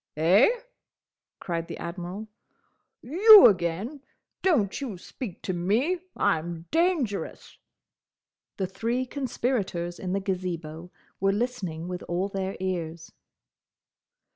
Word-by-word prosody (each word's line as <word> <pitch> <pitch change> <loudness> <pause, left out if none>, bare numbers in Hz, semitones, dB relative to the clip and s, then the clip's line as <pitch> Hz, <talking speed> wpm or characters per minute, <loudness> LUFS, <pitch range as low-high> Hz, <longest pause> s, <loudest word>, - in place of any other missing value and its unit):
"Eh?" 180 - +5 0.9
cried 165 -2 -3
the - - -7
Admiral. 180 +5 -6 0.8
"You, 400 - +9
again! 190 - +1 0.4
Don't 270 - +1
you 235 -9 -4
speak 195 +1 -8
to 185 - -2
me! 225 - +1 0.2
I'm 165 +1 0
dangerous!" 325 - -1 1.0
The 190 - 0
three 230 +7 -2
conspirators 235 -10 -2
in 185 -1 -3
the 195 - +1
Gazebo 180 -4 -4 0.3
were 195 +1 +2
listening 195 -7 -3
with 180 0 -5
all 180 +3 -1
their 195 -1 -3
ears. 170 -3 -4
190 Hz, 105 wpm, -27 LUFS, 175-245 Hz, 1.0 s, You